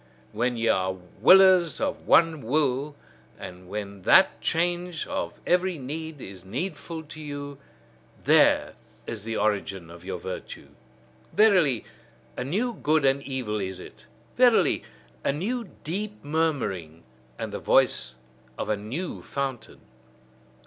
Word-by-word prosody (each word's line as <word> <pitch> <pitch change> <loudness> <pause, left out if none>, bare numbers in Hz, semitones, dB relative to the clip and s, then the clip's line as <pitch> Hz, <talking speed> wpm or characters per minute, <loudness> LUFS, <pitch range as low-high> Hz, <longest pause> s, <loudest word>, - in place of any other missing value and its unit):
When 120 +3 -1
ye 115 0 0
are 95 -2 +2 0.3
willers 185 - +6
of 280 0 -3
one 165 -3 +5
will, 140 +3 0 0.4
and 90 -1 -10
when 100 -1 -6
that - - +5
change 175 0 -1
of - - -4
every 180 0 +2
need 155 +3 -6
is 95 -6 -10
needful 160 - -5
to 155 +1 -11
you: 145 -1 -7 0.6
there - - +4 0.3
is 105 -3 -5
the 115 0 -3
origin 100 -4 -1
of 85 0 -12
your 95 0 -4
virtue. 95 +1 -7 0.6
Verily, 180 - +4 0.5
a - - -3
new 210 - -1
good 155 -6 +1
and 135 +1 +3
evil 125 -6 -3
is 95 -1 -4
it! - - -13 0.3
Verily, 245 -2 +4 0.4
a - - +2
new 210 - -3
deep 205 +6 -4
murmuring, 135 - -2 0.3
and - - -5
the - - -3
voice 60 0 +2 0.4
of - - -4
a 105 - +2
new 120 - -5
fountain! 135 -5 -5
140 Hz, 130 wpm, -26 LUFS, 105-170 Hz, 0.6 s, willers